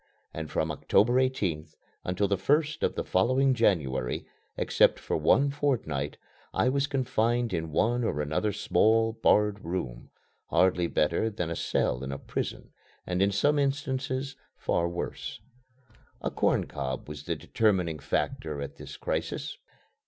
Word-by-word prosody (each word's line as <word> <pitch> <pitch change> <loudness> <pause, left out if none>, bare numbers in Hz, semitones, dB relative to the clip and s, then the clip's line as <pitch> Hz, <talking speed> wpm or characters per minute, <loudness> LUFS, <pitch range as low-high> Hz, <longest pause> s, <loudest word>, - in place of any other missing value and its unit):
And 80 -1 -5
from 80 0 0
October 105 - +3
18th 85 -12 -1 0.3
until 95 +3 0
the 100 - +2
first 150 - +1
of - - +1
the - - -1
following 130 +8 +3
January, 75 - +1 0.3
except - - +3
for - - -3
one 135 - +3
fortnight, 115 - -1 0.4
I 125 - +3
was 140 +1 +1
confined 120 -4 0
in 80 -2 -2
one 120 +9 +2
or 110 - -1
another 80 +8 0
small, 110 +2 +3
barred 105 -2 +3
room, 80 -9 -4 0.4
hardly 90 -2 +3
better 85 +8 +1
than 90 -6 -3
a - - -2
cell 65 -4 0
in 70 - -4
a 70 - -3
prison - - -5 0.3
and 90 +1 -1
in 100 +1 +4
some 145 +9 +2
instances 135 -1 -1 0.2
far 85 0 0
worse. 85 0 -5 0.8
A - - -2
corn - - +2
cob 65 -2 -4
was 75 0 -8
the - - -1
determining 90 -8 +1
factor 75 0 -2
at 70 - -6
this - - -9
crisis. - - -3
100 Hz, 145 wpm, -28 LUFS, 80-125 Hz, 0.8 s, in